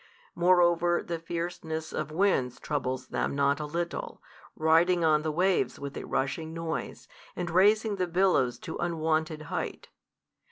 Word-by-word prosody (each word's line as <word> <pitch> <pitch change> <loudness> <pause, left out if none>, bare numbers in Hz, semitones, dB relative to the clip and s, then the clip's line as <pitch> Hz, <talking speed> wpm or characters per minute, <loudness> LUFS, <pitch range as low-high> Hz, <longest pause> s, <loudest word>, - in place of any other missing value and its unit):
Moreover 175 -1 +3
the 170 -1 -4
fierceness 165 -1 -4
of 155 -1 -3
winds 155 -8 +1
troubles 130 -3 -3
them - - -1
not 140 +1 +2
a 150 - -4
little, 170 +3 -4 0.4
riding 165 +3 +3
on 155 -1 +4
the 155 0 -1
waves 180 +4 +1
with 140 -1 -6
a - - -5
rushing 160 +4 -2
noise, 165 -1 -4 0.3
and 175 -1 -3
raising 205 +3 +3
the 180 -1 0
billows 170 -9 +2
to - - -6
unwonted 160 -2 -1
height. - - -5
165 Hz, 145 wpm, -28 LUFS, 155-175 Hz, 0.4 s, on